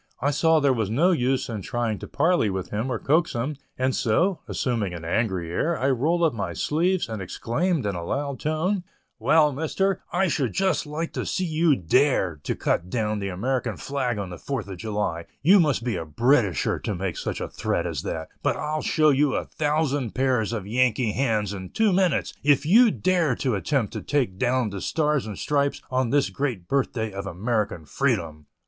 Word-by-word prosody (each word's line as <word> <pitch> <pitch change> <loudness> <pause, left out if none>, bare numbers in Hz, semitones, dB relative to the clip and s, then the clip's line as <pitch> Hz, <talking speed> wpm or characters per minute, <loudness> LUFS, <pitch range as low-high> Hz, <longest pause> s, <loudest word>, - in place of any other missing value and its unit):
I 140 +3 +1
saw 160 +2 +3
there 140 -2 +3
was 110 -5 -1
no 160 +12 +3
use 130 -5 +1
in 110 -4 -4
trying 115 +1 -2
to - - -8
parley 160 - +2
with 95 -1 -4
him 110 +5 -2
or 120 - 0
coax 160 +8 +1
him, 130 +5 -2 0.2
and 130 0 +1
so, 170 - +1
assuming 110 -8 -1
an 80 -1 -8
angry 90 -3 -1
air, 165 - 0
I 135 +1 +1
rolled 160 +7 +1
up 160 - +3
my 100 -6 -3
sleeves, 175 - 0
and 110 -3 -5
exclaimed, 140 - -1
in 100 - 0
a 85 -2 -4
loud 140 +7 -3
tone, 175 +5 0 0.4
"Well, 155 -2 +4
Mister, 175 +7 -1
I 190 +2 +2
should 140 -7 0
just 190 -4 +1
like 160 +3 -4
to - - -2
see 185 - -1
you 160 -2 +3
dare 95 - +2
to - - -2
cut 85 +2 -1
down 110 -1 -1
the 100 - -3
American 115 +2 -2
flag 130 -5 -2
on 100 -3 -4
the 85 - -8
Fourth 135 -7 -4
of 95 -2 -7
July; 105 -6 -2 0.2
you 190 +6 +7
must 145 -8 +2
be 115 -6 -1
a - - -3
'Britisher' 100 - +1
to 105 - -3
make 95 -1 -3
such - - -4
a - - -3
threat - - -2
as - - -3
that; - - -4
but - - 0
I'll 155 0 -2
show 155 -1 +3
you 140 +1 +2
a - - -1
thousand 145 -5 -1
pairs 125 -5 +1
of 110 -5 -3
Yankee 120 +1 +1
hands 110 -5 0
in 95 -2 -7
two 220 -3 +2
minutes, 180 -4 +1
if 145 0 +3
you 225 +9 +6
dare 180 -9 +1
to 130 -4 -1
attempt 105 - -1
to - - -4
take 125 -10 -1
down 125 -3 +1
the 100 -1 -5
stars 150 -6 0
and 105 -3 -6
stripes 140 -1 0
on 130 -1 +1
this 140 +1 +2
great 125 -11 -3
birth 140 -1 +1
day 110 -4 -3
of 100 0 -5
American 100 -3 -2
freedom!" 75 0 -1
130 Hz, 205 wpm, -25 LUFS, 105-150 Hz, 0.4 s, you